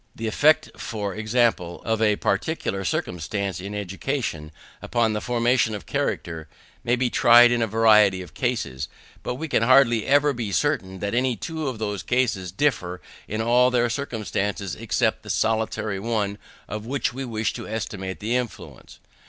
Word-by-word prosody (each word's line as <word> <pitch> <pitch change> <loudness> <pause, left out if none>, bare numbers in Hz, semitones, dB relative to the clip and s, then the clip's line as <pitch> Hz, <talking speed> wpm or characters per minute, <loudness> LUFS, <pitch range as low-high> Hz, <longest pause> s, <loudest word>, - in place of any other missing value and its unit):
The 115 - -5
effect, 145 +8 +3
for 105 -4 -4
example, 110 -5 0
of 110 0 -1
a 105 -2 +4
particular 100 -2 -1
circumstance 90 +2 -2
in 100 +2 -6
education, 95 - -3 0.3
upon 115 -2 +1
the 105 - -2
formation 120 -2 +1
of 105 - -8
character, 80 -2 -3 0.4
may 120 - +2
be 125 -1 0
tried 120 +1 +7
in 120 -1 +1
a 115 - +1
variety 105 -4 +4
of 90 - -14
cases, 80 - -2 0.3
but 125 - -3
we 160 +5 -5
can 140 - +1
hardly 120 -2 +4
ever 145 +1 +4
be 115 -5 -4
certain 95 -10 -1
that 100 +1 -2
any 125 0 +1
two 160 +6 -4
of 130 -4 -3
those 105 -3 -3
cases 115 -8 0
differ 90 -6 0 0.3
in 110 +2 -2
all 125 +2 +4
their 120 -1 +1
circumstances 105 - -3
except - - 0
the - - -12
solitary 110 -2 0
one 105 -2 -2 0.3
of 105 +1 -6
which 135 -1 -1
we 135 +2 -5
wish 110 -5 -2
to - - -7
estimate 100 -3 -5
the 115 +4 0
influence. 125 -4 -5
110 Hz, 165 wpm, -24 LUFS, 100-125 Hz, 0.4 s, tried